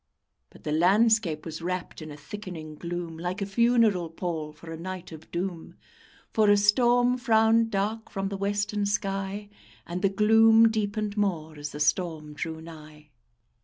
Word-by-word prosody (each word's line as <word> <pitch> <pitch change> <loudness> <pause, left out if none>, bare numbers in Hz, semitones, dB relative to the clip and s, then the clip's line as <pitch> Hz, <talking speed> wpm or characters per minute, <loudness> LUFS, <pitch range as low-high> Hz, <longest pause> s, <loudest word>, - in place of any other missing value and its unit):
But - - -18
the 150 - -3
landscape 185 0 +3
was 165 0 -6
wrapped 180 0 -4
in 155 - -8
a 145 - -9
thickening 165 -1 -8
gloom, 170 0 -6
Like 180 +4 -3
a 200 - -1
funeral 220 -4 +2
pall 165 -2 -4
for 165 +2 -12
a - - -5
night 185 0 -7
of 160 0 -12
doom; 175 -1 -5 0.6
For 215 -2 +4
a 205 - +6
storm 245 +4 +3
frowned 225 -2 +3
dark 215 +2 -2
from 195 -1 -3
the 200 - -4
western 205 +1 -1
sky, 200 0 -3 0.3
And 175 +1 -5
the 195 - +3
gloom 225 +2 +5
deepened 215 -1 -2
more 165 -6 -1
as 145 0 -6
the 145 - -8
storm 155 0 0
drew 160 +2 -5
nigh. 155 -2 -13
195 Hz, 165 wpm, -27 LUFS, 165-210 Hz, 0.6 s, a